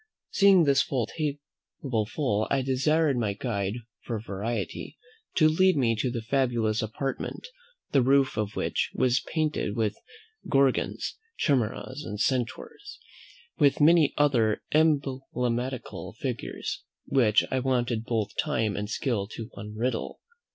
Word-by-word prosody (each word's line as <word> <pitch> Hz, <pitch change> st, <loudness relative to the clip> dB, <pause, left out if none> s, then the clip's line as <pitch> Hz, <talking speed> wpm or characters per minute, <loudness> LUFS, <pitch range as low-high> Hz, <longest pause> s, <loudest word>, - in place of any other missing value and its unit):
Seeing 195 Hz, -3 st, +6 dB
this 140 Hz, -2 st, +4 dB
table 140 Hz, -2 st, -3 dB
full, 120 Hz, -5 st, 0 dB
I 135 Hz, -1 st, +1 dB
desired 140 Hz, +2 st, +2 dB
my 110 Hz, -4 st, 0 dB
guide, 100 Hz, -2 st, -2 dB, 0.3 s
for 115 Hz, -2 st, -3 dB
variety, 110 Hz, +2 st, -4 dB, 0.4 s
to 155 Hz, -, +5 dB
lead 185 Hz, +3 st, +4 dB
me 115 Hz, -4 st, +2 dB
to 125 Hz, -, 0 dB
the 120 Hz, -2 st, -4 dB
fabulous 120 Hz, -3 st, +1 dB
apartment, 125 Hz, -, -4 dB, 0.5 s
the 135 Hz, -, +4 dB
roof 135 Hz, +1 st, +3 dB
of 105 Hz, -1 st, -2 dB
which -, -, -1 dB
was 125 Hz, +1 st, +3 dB
painted 155 Hz, -9 st, -2 dB
with 110 Hz, -2 st, 0 dB, 0.5 s
Gorgons, 135 Hz, -, +1 dB, 0.2 s
Chimeras, 130 Hz, +1 st, 0 dB
and 105 Hz, -, -6 dB
Centaurs, 275 Hz, -, -2 dB, 0.6 s
with 140 Hz, -1 st, +4 dB
many 155 Hz, -1 st, +5 dB
other 120 Hz, -8 st, +2 dB
emblematical 130 Hz, -5 st, 0 dB
figures, -, -, -4 dB, 0.2 s
which 115 Hz, -5 st, +3 dB
I 130 Hz, -, +1 dB
wanted 125 Hz, -3 st, 0 dB
both 110 Hz, -4 st, -2 dB
time 115 Hz, -9 st, 0 dB
and 105 Hz, 0 st, -3 dB
skill 115 Hz, -6 st, -1 dB
to 115 Hz, -1 st, -7 dB
unriddle. 110 Hz, +4 st, -3 dB
130 Hz, 125 wpm, -27 LUFS, 110-145 Hz, 0.6 s, Seeing